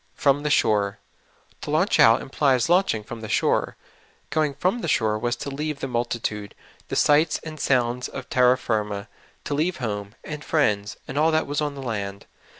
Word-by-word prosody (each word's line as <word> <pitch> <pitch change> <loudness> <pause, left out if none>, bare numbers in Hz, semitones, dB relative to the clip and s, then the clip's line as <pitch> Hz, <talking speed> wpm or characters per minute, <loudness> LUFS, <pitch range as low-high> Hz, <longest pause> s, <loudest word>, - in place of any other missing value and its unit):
''From 145 -2 +3
the 150 - -1
shore.'' 105 -6 +2 0.6
To - - -6
launch 160 +7 +2
out 115 +3 +6
implies 135 -1 +1
launching 175 - +2
from 115 +1 -8
the 110 - -7
shore. - - +1 0.5
Going 150 -3 +1
from 185 - 0
the - - -3
shore 110 -6 +1
was 120 +2 -1
to 140 - -6
leave 150 +1 -3
the 135 - -3
multitude, 115 -4 -3 0.3
the - - -4
sights 150 +2 +3
and 155 -1 -8
sounds 125 -2 +1
of - - -8
terra 125 -1 +4
86 130 - -7
SOUL 115 - +1
FOOD. 110 -1 +2
Jirma; 100 -1 -5 0.4
to 145 - -3
leave 165 +5 0
home, 105 -4 -4
and 150 -1 -6
friends, 105 -10 0
and 135 +3 -2
all 160 +1 +4
that 155 0 +1
was 145 +1 -2
on 145 -1 -2
the 135 - -7
land. 100 -4 -4
130 Hz, 200 wpm, -24 LUFS, 110-150 Hz, 0.6 s, out